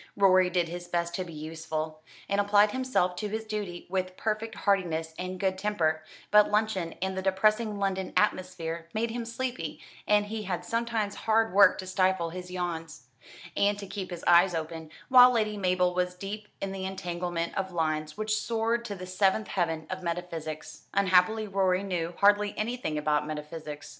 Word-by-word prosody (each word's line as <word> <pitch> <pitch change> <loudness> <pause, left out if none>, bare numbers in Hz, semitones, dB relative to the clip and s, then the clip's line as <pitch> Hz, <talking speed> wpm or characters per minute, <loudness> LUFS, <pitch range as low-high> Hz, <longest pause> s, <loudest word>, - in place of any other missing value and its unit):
Rorie 185 -2 +5
did 175 -1 +1
his 175 +1 -7
best 170 0 -1
to 185 - -2
be 175 - -10
useful, 155 0 -5 0.3
and 200 0 +2
applied 205 +1 +4
himself 255 -9 0
to 210 - -3
his 220 +1 -4
duty 205 -5 -5
with 185 0 -2
perfect 220 0 -2
heartiness 165 -5 0
and 185 0 -4
good 190 -1 0
temper; 165 -6 0 0.3
but 210 0 +6
luncheon 210 -5 0
and 190 0 -2
the 190 - -2
depressing 215 +3 +2
London 190 -1 -1
atmosphere 170 -5 -1
made 225 +1 0
him 235 0 -4
sleepy, 245 +2 -4 0.3
and 210 0 +4
he 220 +1 -4
had 180 -3 -3
sometimes 230 -1 -1
hard 225 -2 +1
work 200 +1 +7
to 190 - -6
stifle 185 -2 +1
his 180 +1 -7
yawns, 165 -7 -5 0.5
and 200 0 +2
to 205 - -7
keep 195 -1 -5
his 175 -2 -7
eyes 175 +1 +6
open, 160 0 -5 0.2
while 250 -1 +9
Lady 215 -3 +1
Mabel 180 -2 +1
was 180 0 -1
deep 205 +3 -6
in 195 - -3
the 195 -1 -5
entanglement 175 -2 -3
of 190 -1 -2
lines 155 -2 -1
which 215 0 0
soared 230 +2 0
to 205 -3 -4
the 185 -1 -7
seventh 190 +3 +1
heaven 165 -4 -1
of 185 0 -4
metaphysics. 170 -3 -5
Unhappily 200 +3 +3
Rorie 190 -1 +1
knew 175 -3 -2
hardly 205 0 +3
anything 220 -8 -2
about 150 0 +1
metaphysics. 150 -1 -6
185 Hz, 175 wpm, -28 LUFS, 170-210 Hz, 0.5 s, while